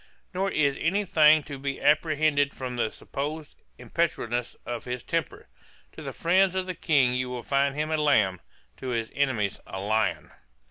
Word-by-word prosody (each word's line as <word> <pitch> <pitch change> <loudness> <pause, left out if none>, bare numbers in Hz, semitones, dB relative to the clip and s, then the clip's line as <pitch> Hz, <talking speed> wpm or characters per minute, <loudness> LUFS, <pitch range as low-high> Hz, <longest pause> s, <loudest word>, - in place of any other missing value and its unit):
Nor 190 +2 0
is 140 -6 +1
any 200 +5 +1
thing 155 -3 +5
to 140 -1 -8
be 135 0 -3
apprehended 150 -1 +2
from 125 -2 -5
the 120 -2 0
supposed 150 +2 -5 0.2
impetuosity 120 -8 -2
of 120 -2 -5
his 125 -1 -4
temper. - - -3 0.4
To - - -11
the - - -5
friends 185 +2 +2
of 185 -1 0
the 185 - -3
King 140 -7 +2
you 125 0 -1
will 125 -1 -5
find 140 0 +1
him 155 +1 -2
a 155 - +2
lamb, 105 - +2 0.4
to 130 - -7
his 115 -3 -2
enemies 125 -8 0
a 95 - -6
lion. 100 -6 0
140 Hz, 175 wpm, -27 LUFS, 120-155 Hz, 0.4 s, thing